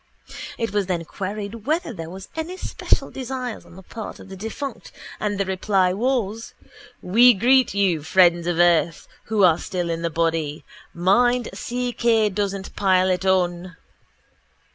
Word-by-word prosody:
It 230 -1 -2
was 205 -3 0
then 175 -3 -2
queried 205 +5 -6
whether 320 -2 0
there 165 -4 -7
were 190 +2 -9
any 325 +3 -4
special - - -1
desires 255 -2 -5
on - - -15
the 190 - -12
part 220 +3 -8
of - - -13
the 190 - -8
defunct 225 +5 -6 0.3
and 205 -1 -2
the 200 - +1
reply 190 -1 +1
was: 225 -1 -2 0.5
_We 235 +3 +6
greet 255 0 +4
you, 190 -6 +2
friends 175 +1 +3
of 175 -2 0
earth, 170 -2 +2 0.2
who 215 -2 +1
are 170 -3 +5
still 175 -2 -3
in 165 0 -3
the 170 - -1
body. 160 -2 -1 0.3
Mind 240 +7 +2
C. 245 0 -3
K. 225 -3 +2
doesn't 195 -1 -3
pile 185 -1 +3
it 185 +1 -1
on. 180 -1 0
195 Hz, 160 wpm, -22 LUFS, 175-230 Hz, 0.5 s, We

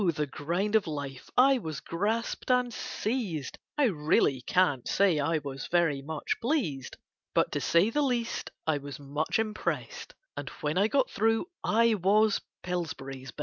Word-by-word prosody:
the 150 -2 0
grind 175 +9 -2
of 215 -5 +3
life 140 -4 -5
I 265 +1 +6
was 160 -8 -5
grasped 215 +10 -2
and 250 -1 +2
seized, 205 - -3 0.2
I 295 - +3
really 150 - +2
can't 145 -4 +2
say 190 -6 +3
I 155 +3 +1
was 135 -2 -5
very 165 -5 +2
much 150 +2 -3
pleased; 225 - -1 0.4
But - - +3
to - - -1
say 175 +7 +3
the 295 - +1
least, 245 -4 -1 0.2
I 155 -2 +1
was 140 0 -8
much 145 +2 -1
impressed, 455 - -3 0.2
And - - -5
when 150 0 -1
I 200 +3 +4
got 270 +2 +1
through 225 +5 +2 0.2
I 230 +1 +4
was 210 +2 +3 0.2
Pillsbury's 140 -7 -4
Best. - - -13
180 Hz, 160 wpm, -29 LUFS, 150-225 Hz, 0.4 s, I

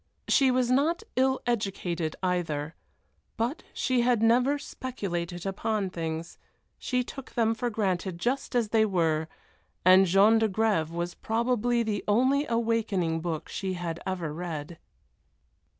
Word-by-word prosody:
She 270 -2 +4
was 250 -1 +2
not 310 +9 +2
ill 265 +1 +2
educated 185 -8 -2
either, 165 -4 -1 0.6
but 235 +6 -1
she 255 -2 +1
had 240 -2 +2
never 250 +5 +4
speculated 175 -11 -5
upon 195 0 -1
things, 165 -1 -5 0.4
she 250 -1 0
took 270 +1 -10
them 225 -1 +2
for 240 +2 -2
granted 190 -5 -1
just 250 +7 -2
as 235 -3 +2
they 220 0 +4
were, 165 -6 +1 0.6
and 185 +1 +7
Jean 200 +5 +5
d'Agrève 215 -6 +1
was 170 +1 -3
probably 235 +1 0
the 210 -3 -2
only 260 +7 +3
awakening 220 -8 0
book 165 -2 -4
she 190 -2 -3
had 170 -2 -4
ever 175 -5 -3
read. 165 -1 -6
205 Hz, 135 wpm, -28 LUFS, 175-240 Hz, 0.6 s, and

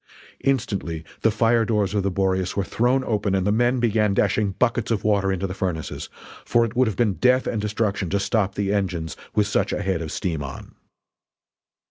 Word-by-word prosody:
Instantly 100 -11 -1 0.2
the 115 - +4
fire 115 +2 +3
doors 105 -3 0
of 105 - +1
the 100 - 0
Boreas 95 0 0
were 100 - +2
thrown 125 +6 +1
open 105 -4 0
and 95 -1 0
the 105 - +2
men 120 +3 +2
began 110 -3 +2
dashing 100 0 +1
buckets 120 0 0
of 115 -3 0
water 100 -2 +2
into 95 0 -1
the 90 - -4
furnaces 90 -6 -4 0.3
for 120 0 +3
it 115 - -6
would 130 0 +3
have 110 - -2
been 110 -5 +2
death 125 +5 +3
and 110 - -1
destruction 105 -3 -1
to 100 - +1
stop 100 -1 0
the 100 0 0
engines 90 -6 -2 0.2
with 105 - +3
such 100 -1 0
a 105 - -2
head 95 -3 -1
of 80 -1 -5
steam 80 -5 -2
on. 70 -1 -8
100 Hz, 200 wpm, -23 LUFS, 95-115 Hz, 0.3 s, the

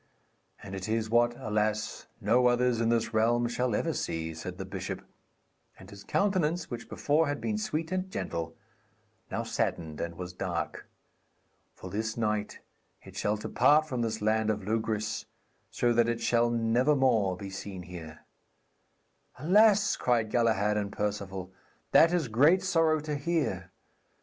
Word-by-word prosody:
'And 95 - -8
it 95 +2 -5
is 110 0 -1
what, 120 0 +3
alas, 110 0 -2
no 120 +4 +3
others 120 -1 +2
in 115 - +2
this 115 0 0
realm 120 +2 +2
shall 120 -1 -1
ever - - 0
see,' 80 0 -3
said 90 +3 -7
the 95 - -5
bishop; 95 -1 -5 0.7
and 95 +2 -14
his 100 0 -11
countenance, 180 -5 0
which 120 -1 -6
before 150 +2 +1
had 145 0 -2
been 215 -1 -2
sweet 165 -5 -3
and 185 0 -2
gentle, 80 - -4 0.7
now - - -2
saddened 80 -3 -2
and 85 0 -4
was 90 -1 -6
dark. 90 -2 -4 0.9
'For 95 - -9
this 110 +2 -3
night 105 -2 -2 0.4
it - - -13
shall 105 - 0
depart 145 +8 +3
from 125 -5 -2
this 115 -2 -2
land 110 0 +2
of 105 -2 -2
Logris, 110 -1 -1 0.4
so 120 -1 +1
that 120 0 +3
it 120 -1 -1
shall 120 0 +2
never 120 +5 +2
more 110 -9 +2
be 100 0 -7
seen 95 -1 -7
here. 85 -3 -10 1.2
'Alas,' 205 - +4
cried 115 -3 +1
Galahad 110 -3 +2
and 100 -1 -2
Perceval, 100 -3 -3 0.4
'that 165 - +6
is 175 -6 +1
great 150 +12 +4
sorrow 165 -4 +3
to 150 0 -4
hear. 140 - -1
115 Hz, 155 wpm, -29 LUFS, 100-135 Hz, 1.2 s, that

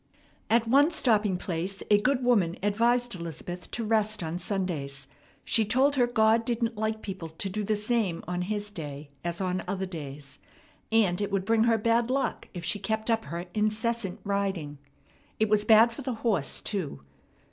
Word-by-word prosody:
At 230 0 +3
one 280 +6 +5
stopping 215 - +2
place 180 +2 -4
a 205 0 +6
good 255 +2 +1
woman 200 -9 +2
advised 235 +4 +2
Elizabeth 175 +1 -6
to 235 - -3
rest 215 -2 +1
on 165 +2 -3
Sundays. 150 -9 -3 0.4
She 225 - +3
told 260 +7 +3
her 245 -3 +3
God 225 -1 +3
didn't 230 0 -1
like 220 +1 -2
people 185 -4 -6
to 160 +5 -4
do 210 +2 -2
the 215 +1 +1
same 210 -5 0
on 180 0 -2
His 205 +2 -3
day 145 -5 -7
as 170 0 -3
on 185 -1 -1
other 190 0 -2
days, 145 -5 -8 0.5
and 205 -5 +3
it 205 - -1
would 195 -1 0
bring 225 +1 +3
her 230 -1 +4
bad 230 +2 +2
luck 270 +1 -1
if 175 -3 -7
she 205 +4 0
kept 220 +3 -1
up 225 0 0
her 170 +1 -5
incessant 215 -1 -1
riding. 190 -8 -2 0.6
It 220 -1 +2
was 210 0 +3
bad 225 +1 +7
for 235 - -8
the 255 -3 -3
horse 195 -12 +1
too. 180 - -4
210 Hz, 180 wpm, -28 LUFS, 180-230 Hz, 0.6 s, bad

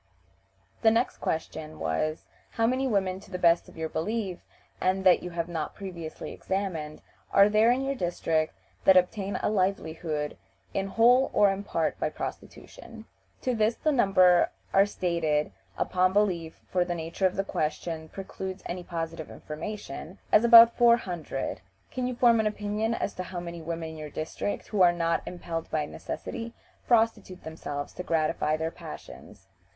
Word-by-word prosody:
The 220 - +6
next 230 +3 +1
question 160 -1 -4
was, 80 - -1 0.3
"How 225 - +1
many 260 +3 +1
women, 190 -5 0
to 195 - -16
the 185 - -4
best 170 -1 +3
of - - -16
your 160 0 -2
belief, 190 +3 -3 0.4
and 190 +1 +1
that 185 -2 +6
you 180 - -5
have 170 -1 -3
not 165 -3 -4
previously 175 -5 -7
examined, 175 -6 -4 0.3
are 200 - +7
there 215 +2 +4
in 255 +2 +2
your 275 +1 0
district 165 -7 -1 0.3
that 190 -1 +8
obtain 195 +2 +1
a - - +2
livelihood 160 -6 -1 0.4
in 195 0 -1
whole 245 +6 +4
or 205 -1 +5
in 195 +1 -4
part - - -1
by - - 0
prostitution?" 225 -1 -8 0.4
To 255 - +1
this 220 0 +2
the 310 - 0
numbers 185 -8 +5 0.3
are 195 +1 +5
stated 165 -6 0 0.3
(upon 185 0 +2
belief, 180 -6 0
for 180 -1 +3
the 175 0 -3
nature 170 +3 0
of 185 - -5
the 195 - 0
question 160 -1 -3
precludes 190 0 -7
any 180 +1 -4
positive 165 -2 -5
information) 165 +1 -7
as 215 - +6
about 235 0 +9
four 235 -1 +6
hundred. 165 - -4 0.3
"Can 255 -1 -2
you 250 - -3
form 235 -2 +5
an 220 - +2
opinion 210 +2 -1
as - - -2
to 185 - -5
how 180 -1 -5
many 170 -1 -7
women 165 0 -4
in 160 - -9
your 155 -1 -7
district, 155 +7 -4
who 205 -3 0
are 175 -1 +7
not 165 -1 0
impelled 170 -2 -5
by 150 -1 0
necessity, 230 - -6 0.3
prostitute 225 -6 +1
themselves 145 -2 -6
to - - -6
gratify 155 -2 0
their 160 +1 -2
passions?" 75 - -11
185 Hz, 165 wpm, -28 LUFS, 165-210 Hz, 0.4 s, about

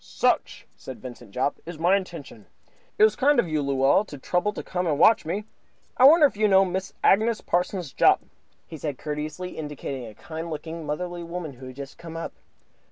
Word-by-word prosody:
"Such," - - 0
said 130 - -9
Vincent 125 -5 -10
Jopp, 130 +7 -1
"is 170 -1 -8
my 175 +4 +3
intention. 195 -2 -6 0.5
It 425 - +5
was 435 - +5
kind 285 0 +3
of 210 - +2
you, 155 -2 0
Luella, 140 +5 +3
to 145 - -9
trouble 180 +9 0
to - - -6
come 180 -1 -2
and 150 -3 +1
watch 220 +5 +5
me. 200 +5 -2 0.5
I 255 - +6
wonder 310 +2 +8
if 280 - +1
you 215 +1 +3
know 195 -1 +5
Mrs. 185 +1 -4
Agnes 220 +3 +4
Parsons 175 -4 -1
Jopp?" - - +4 0.4
he 160 - -9
said, 145 -3 -4
courteously, 155 +4 -5
indicating 140 -4 -5
a 110 - -12
kind 160 +6 -7
looking, 160 0 -6
motherly 175 +3 -3
woman 170 -3 -6
who 130 +1 -11
had 130 - -10
just 140 0 -9
come 165 -1 -8
up. 165 - -5
165 Hz, 200 wpm, -25 LUFS, 145-190 Hz, 0.5 s, wonder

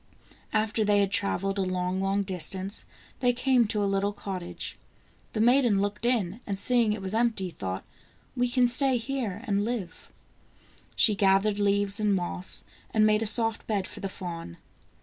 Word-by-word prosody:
After 215 +1 +1
they 205 -1 +3
had 200 -1 +1
traveled 195 0 -1
a - - +2
long, 185 0 -1
long 195 +1 +1
distance, 190 +2 -4 0.3
they 245 -2 +3
came 250 -2 +3
to 210 0 -1
a - - +2
little 195 +1 0
cottage. 190 -3 -6 0.6
The 215 - -2
maiden 240 -3 +4
looked 205 +3 -1
in, 215 -5 0
and 200 -2 -2
seeing 235 +1 +3
it 210 -2 -5
was 190 +1 -4
empty, 220 -5 +1
thought: 95 - -5 0.5
"We 245 -1 +1
can 250 0 +3
stay 255 +1 +3
here 230 -4 -3
and 200 -2 +1
live." 215 -7 -5 0.8
She 215 - +5
gathered 200 +1 +3
leaves 200 0 +2
and 210 -2 +2
moss 180 0 -2 0.3
and 215 -1 +3
made 215 0 +3
a 225 - +1
soft 225 0 +1
bed 200 -4 -1
for - - -10
the 195 - -3
fawn. 170 - -7
205 Hz, 170 wpm, -27 LUFS, 195-225 Hz, 0.8 s, She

